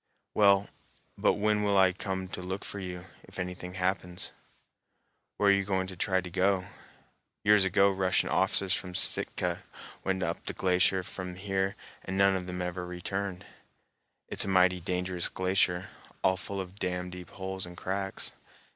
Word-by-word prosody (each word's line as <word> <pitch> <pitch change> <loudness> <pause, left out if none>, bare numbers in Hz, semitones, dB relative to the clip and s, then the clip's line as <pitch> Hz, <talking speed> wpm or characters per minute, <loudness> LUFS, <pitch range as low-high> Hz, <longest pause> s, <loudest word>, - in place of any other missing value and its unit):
"Well, 100 -1 +5 0.5
but - - +3
when 105 0 +2
will 100 -1 +3
I 95 -1 +6
come 95 0 -3
to 90 - -5
look 95 +2 -4
for 100 - -5
you, 90 -1 -6 0.2
if - - -14
anything 90 0 -4
happens? 90 -1 -1 1.1
Where 100 - +4
are - - +7
you 100 0 +2
going 95 -1 0
to 95 0 -8
try 95 +1 +1
to 90 - -7
go? 95 +1 +2 0.8
Years 105 -2 +6
ago 100 +1 +4
Russian 95 -1 +1
officers 95 -2 +2
from 90 -1 -2
Sitka 95 - +1 0.4
went 95 -1 0
up - - -3
the - - -2
glacier 95 0 +2
from 90 0 -6
here 95 0 -1 0.3
and 95 - -3
none 95 -2 +2
ever 90 0 -3
returned. 95 +1 -4 0.8
It's - - -2
a - - -4
mighty 90 -1 +4
dangerous 90 0 -1
glacier, 95 +1 +1 0.3
all 95 - +4
full 100 +1 -5
of 95 +1 -7
damn 90 0 -2
deep 90 -1 -9
holes 95 -1 -5
and 90 0 -11
cracks. 95 +1 -1
95 Hz, 160 wpm, -30 LUFS, 90-95 Hz, 1.1 s, are